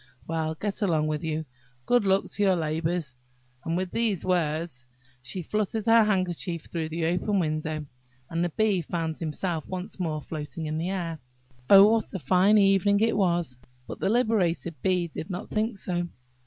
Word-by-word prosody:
Well, 160 -1 -1
get 200 +5 -4
along 165 -6 +2
with 155 +1 -2
you! 160 0 -2 0.4
Good 245 -4 +3
luck 195 0 +3
to - - -4
your 195 -2 +4
labours!" 160 -2 -2 0.5
And 165 +1 -1
with 185 0 -2
these 225 -6 0
words 160 -6 0 0.4
she 130 +9 -5
fluttered 215 +3 -1
her 230 -1 +6
handkerchief 185 -4 -1
through 160 -2 -4
the 165 +1 -2
open 180 +5 +1
window, 155 -2 -1 0.4
and 165 +3 -1
the 175 - +1
Bee 205 +1 +1
found 160 -1 -3
himself 165 0 -3
once 185 +1 -5
more 160 -4 -1
floating 155 +1 -6
in 155 +1 -2
the 170 +3 -2
air. 170 -4 -3 0.5
Oh, 200 0 +10
what 225 -1 +1
a - - +1
fine 185 +7 +4
evening 200 0 +4
it 225 +2 +2
was! 175 -9 +1 0.3
But - - -8
the - - 0
liberated 205 -8 +1
Bee 180 -2 +1
did 160 0 -7
not 185 +2 -5
think 215 0 0
so. 175 -2 -2
175 Hz, 175 wpm, -27 LUFS, 160-195 Hz, 0.5 s, Oh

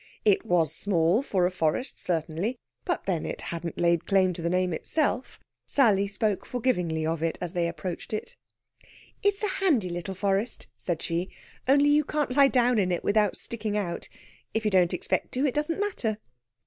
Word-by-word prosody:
It 205 -3 +4
was 165 -3 +2
small, 175 +3 +2
for 190 -10 +1
a 180 - +1
forest, 180 - -1
certainly; 170 +7 -1 0.3
but, 355 - -1
then, 175 -5 0
it - - -4
hadn't 170 -1 -5
laid 170 -1 +2
claim 190 -2 +3
to 170 - -7
the 170 - 0
name 180 0 +1
itself. 265 - -1 0.3
Sally 205 -8 +3
spoke 205 0 -1
forgivingly 180 -11 -1
of 165 0 -1
it 165 0 -1
as 175 -1 -4
they 175 -2 +1
approached 170 +1 -5
it. 215 - -4 0.9
"It's 405 +1 +1
a - - +3
handy 270 - +3
little 175 +2 -4
forest," 200 +4 -1
said 170 -3 -3
she; 170 +3 -1 0.4
"only 285 +2 +5
you 300 +1 +4
can't 295 -3 -1
lie 280 -1 +7
down 245 -3 +3
in 185 -2 +1
it 175 - -1
without 210 0 +2
sticking 220 -3 -3
out. 185 -5 -3 0.5
If 220 0 0
you 210 - +2
don't 180 -3 +4
expect 180 - -1
to, 260 +3 +1
it 270 - +1
doesn't 300 +4 -1
matter." 310 - -1
195 Hz, 185 wpm, -27 LUFS, 175-250 Hz, 0.9 s, lie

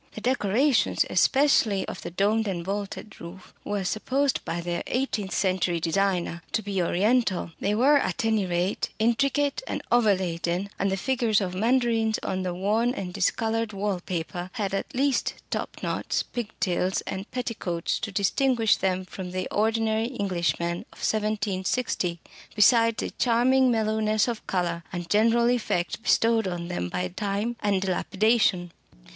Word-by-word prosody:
The 220 - -6
decorations, 250 +2 +2
especially 265 -8 +3
of - - -6
the - - -5
domed 210 +5 +1
and 175 -3 -3
vaulted 200 +2 -5
roof, 175 +2 -11
were 205 -1 -2
supposed 260 +8 0
by 170 - -3
their 175 0 -3
eighteenth 225 -7 -1
century 185 -3 +1
designer 175 0 0
to 220 - 0
be 195 -2 -1
"Oriental"; 195 +1 +1
they 205 +1 0
were, 275 +6 +5
at 270 -2 -2
any 220 -4 +1
rate, 180 +2 -1
intricate 275 - +1
and - - -3
overladen; 190 -5 +1
and 195 0 +1
the 195 - 0
figures 235 -1 +1
of 185 -3 -3
mandarins 225 +1 +2
on 185 - -2
the 185 -1 -2
worn 220 +7 +1
and 180 -5 -5
discoloured 225 +3 0
wall 200 -1 -1
paper 175 0 -4
had, 205 -5 -2
at 195 - -3
least, 270 -1 +1 0.2
top - - -3
knots, - - -1
pigtails, 190 -5 -2
and 190 +2 -6
petticoats 220 -9 -2
to 220 - -4
distinguish 225 +3 +2
them 185 -1 -1
from 185 0 -7
the 185 0 -3
ordinary 225 +2 0
Englishmen 170 -3 0
of - - -18
1760, 210 -3 -1 0.4
besides 230 +1 +4
a - - -4
charming 255 +2 +3
mellowness 215 -1 +1
of 235 -3 -4
colour 175 -2 -1
and 175 -2 -6
general 230 +3 +4
effect 225 -7 0
bestowed 225 -2 +3
on 175 -1 -4
them 90 0 -3
by 90 0 -2
time 205 - -2
and 200 -2 +1
dilapidation. 195 -1 +1
205 Hz, 150 wpm, -26 LUFS, 185-230 Hz, 0.4 s, were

